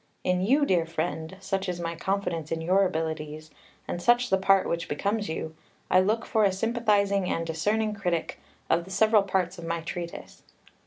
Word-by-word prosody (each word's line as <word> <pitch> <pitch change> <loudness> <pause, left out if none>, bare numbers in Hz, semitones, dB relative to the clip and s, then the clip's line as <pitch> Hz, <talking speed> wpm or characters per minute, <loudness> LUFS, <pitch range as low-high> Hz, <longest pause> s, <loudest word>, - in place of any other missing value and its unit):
In 180 0 +1
you, 275 +9 +3
dear 175 -8 +2
friend 165 +1 -3
such 195 -1 -2
is 175 -1 -3
my 170 0 -3
confidence 170 -3 -2
in 165 - -1
your 185 +4 +3
abilities, 155 -2 -4 0.4
and 175 - -4
such 240 +4 +3
the 190 - +5
part 195 0 +4
which 170 0 -2
becomes 200 +8 -1
you 160 0 -4 0.4
I 185 - +6
look 215 +5 +1
for 220 -3 +2
a 200 - +4
sympathising 200 -2 +1
and 165 - -1
discerning 210 +7 0
critic 180 -5 -2 0.3
of 170 +1 +1
the - - -12
several 215 +2 +4
parts 190 -2 -1
of - - -8
my 165 0 -2
treatise. 170 +1 -7
185 Hz, 180 wpm, -27 LUFS, 165-200 Hz, 0.4 s, I